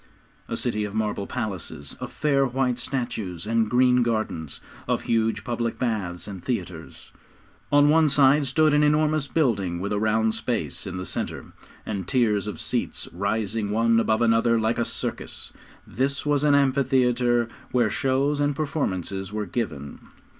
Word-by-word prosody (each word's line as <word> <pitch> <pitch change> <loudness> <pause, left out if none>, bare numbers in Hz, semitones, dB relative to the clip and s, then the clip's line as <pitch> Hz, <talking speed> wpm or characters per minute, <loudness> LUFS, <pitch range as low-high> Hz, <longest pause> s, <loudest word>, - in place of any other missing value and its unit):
A - - -2
city 105 -3 -1
of 105 0 -5
marble 105 -2 -1
palaces, 95 -8 -4
of - - -6
fair 140 -2 +2
white 125 -1 0
statues 115 - -4
and 115 0 +1
green 125 +1 +4
gardens; 110 - -2 0.3
of - - 0
huge 115 -1 0
public 120 -1 -2
baths 105 -8 -2
and 95 -4 -8
theatres. 90 -8 -5 0.6
On 145 0 +6
one 155 0 +5
side 140 +1 +4
stood 155 +3 +3
an 150 - +4
enormous 150 0 +2
building, 100 - 0
with 100 +3 -2
a 105 - 0
round 110 +1 +2
space - - -3
in 95 -1 -5
the 90 - -4
centre, - - -4 0.3
and 100 -4 -4
tiers 105 -5 +1
of 100 -6 -5
seats - - -2
rising 105 +3 -1
one 115 +2 +3
above 110 0 +2
another 115 0 +3
like 110 +2 0
a 120 - +1
circus. - - -5 0.3
This 140 +4 -2
was 145 -1 +1
an 145 -1 +5
amphitheatre, 125 -3 +2 0.2
where 120 -4 +2
shows 140 +2 +1
and 145 0 +1
performances 95 - -2
were 105 0 -3
given. 85 - -4
115 Hz, 155 wpm, -25 LUFS, 105-135 Hz, 0.6 s, On